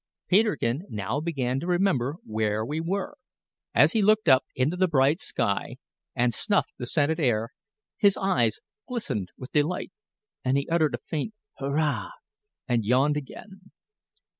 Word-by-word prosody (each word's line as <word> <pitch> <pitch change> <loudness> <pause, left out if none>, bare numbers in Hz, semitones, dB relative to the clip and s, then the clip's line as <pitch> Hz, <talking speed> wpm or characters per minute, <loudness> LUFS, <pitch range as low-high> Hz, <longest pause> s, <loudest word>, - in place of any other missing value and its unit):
Peterkin 185 - +2
now 105 +6 -2
began 135 -5 -1
to 170 - -5
remember 175 -7 +1
where 110 0 -1
we 150 +5 -3
were. 195 - -2 0.6
As - - +6
he 225 - +2
looked 215 -1 +3
up 130 -2 +6
into 135 +7 +1
the 185 +1 +2
bright 145 +1 +3
sky, 100 -3 -1 0.4
and 120 0 +2
snuffed 200 - 0
the 125 - -4
scented 155 +4 +1
air, 115 -6 +1 0.5
his 200 -1 +4
eyes 120 - +1 0.3
glistened 215 - -3
with 130 - -9
delight, 155 +5 0 0.5
and 130 +1 +2
he 140 - -1
uttered 160 -6 +2
a 120 - -13
faint 165 +8 -3 0.2
"Hurrah!" 145 +2 0 0.6
and 120 -4 +1
yawned 130 +7 +3
again. 190 +7 -9
145 Hz, 145 wpm, -26 LUFS, 125-180 Hz, 0.6 s, As